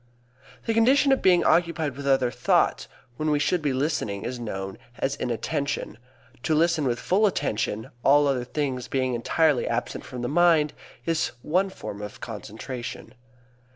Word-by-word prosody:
The 225 - +1
condition 260 +5 +4
of 270 - +3
being 180 -2 +5
occupied 165 -5 +2
with 140 0 -6
other 135 -3 +3
thoughts - - +1 0.3
when 155 0 -1
we 150 - +3
should 160 +4 +1
be 145 -2 0
listening 130 -7 -1
is 125 0 -4
known 95 -4 -5 0.2
as 135 +1 -1
inattention. 125 -1 -3 0.4
To 155 - +1
listen 160 -1 +2
with 120 -1 0
full 205 +4 +3
attention, 110 - -2
all 145 +1 +5
other 135 -3 +1
things 130 -3 -2
being 130 -1 0
entirely 145 +4 +2
absent 120 +1 -2
from 125 -1 -7
the - - 0
mind, 155 0 +4 0.3
is 165 -1 0
one 185 +5 +1
form 105 - -8
of 105 0 -8
concentration. 115 +4 -7
140 Hz, 155 wpm, -25 LUFS, 120-165 Hz, 0.4 s, being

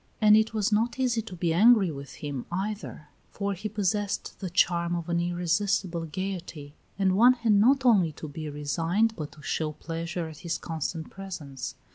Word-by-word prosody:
And 215 -1 +7
it 220 0 +3
was 215 -1 0
not 230 +3 +1
easy 245 -3 +1
to 205 -4 -9
be 170 -1 0
angry 205 -1 +5
with 140 -1 -8
him, 140 -4 -5
either; 190 -5 -4 0.2
for 200 0 -2
he 205 +3 -5
possessed 205 0 -2
the 185 - -4
charm 175 -1 +2
of 170 0 -4
an 170 0 +1
irresistible 175 0 0
gayety, 170 -4 -5 0.2
and 190 -2 +2
one 240 +5 +7
had 235 -3 +1
not 255 +6 +4
only 195 -9 +5
to 155 - -8
be 155 +1 -6
resigned 165 +9 0
but 150 -5 -6
to 150 0 -15
show 155 +1 -1
pleasure 165 +2 -4
at 155 -2 -10
his 170 -2 -2
constant 160 0 -4
presence. 180 -9 -7
180 Hz, 180 wpm, -27 LUFS, 160-210 Hz, 0.2 s, And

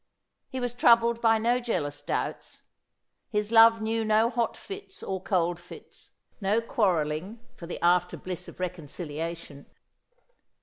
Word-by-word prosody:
He 260 - -4
was 245 -1 -2
troubled 235 -1 +4
by 225 -1 +4
no 235 +3 +2
jealous 175 -12 -3
doubts; - - -4 0.7
his 210 0 -1
love 225 0 +7
knew 225 +1 0
no 220 +2 +3
hot 235 -1 -1
fits 400 0 -9
or 190 -1 -3
cold 175 -3 0
fits, 175 - -13 0.3
no 200 +3 +2
quarrelling 190 - -1
for 170 - -10
the 175 - -6
after 180 0 +3
bliss 180 -3 -6
of - - -12
recorxiliation. 165 -3 -5
210 Hz, 135 wpm, -27 LUFS, 175-230 Hz, 0.7 s, love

